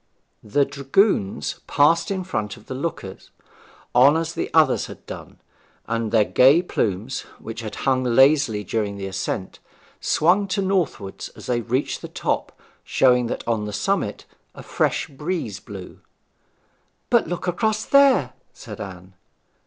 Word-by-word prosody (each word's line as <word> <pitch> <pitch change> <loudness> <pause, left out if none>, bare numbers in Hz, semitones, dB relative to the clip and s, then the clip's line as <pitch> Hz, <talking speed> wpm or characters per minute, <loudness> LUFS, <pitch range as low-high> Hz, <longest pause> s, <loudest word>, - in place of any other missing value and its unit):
The 140 +7 +2
dragoons 140 - 0
passed 155 +4 +3
in 190 -2 -2
front 110 - -3
of 110 - -17
the - - -6
lookers 130 - -5 0.6
on 135 +5 +6
as 165 +1 -2
the - - -3
others - - +3
had - - -12
done, - - -9 0.5
and 115 -1 -2
their 110 -2 +4
gay 140 - +5
plumes, 110 - -2 0.2
which 115 0 -8
had 110 -3 -6
hung 130 -1 +2
lazily 130 -3 +4
during 100 0 -2
the 100 - -5
ascent, 95 0 -4 0.4
swung 185 +6 +2
to 195 +1 -1
northward 170 - -2
as - - -11
they 120 -1 0
reached 125 +5 -2
the - - -6
top, - - -3 0.2
showing 125 -2 +3
that - - -5
on 110 -3 0
the 105 - -5
summit 170 - -1 0.3
a - - -10
fresh - - 0
breeze 145 - -4
blew. 95 -3 -10 1.1
'But 235 -6 +4
look 175 +2 -4
across 215 +4 0
there,' 275 - +4 0.2
said - - -9
Anne. 90 -1 -9
130 Hz, 145 wpm, -23 LUFS, 105-170 Hz, 1.1 s, on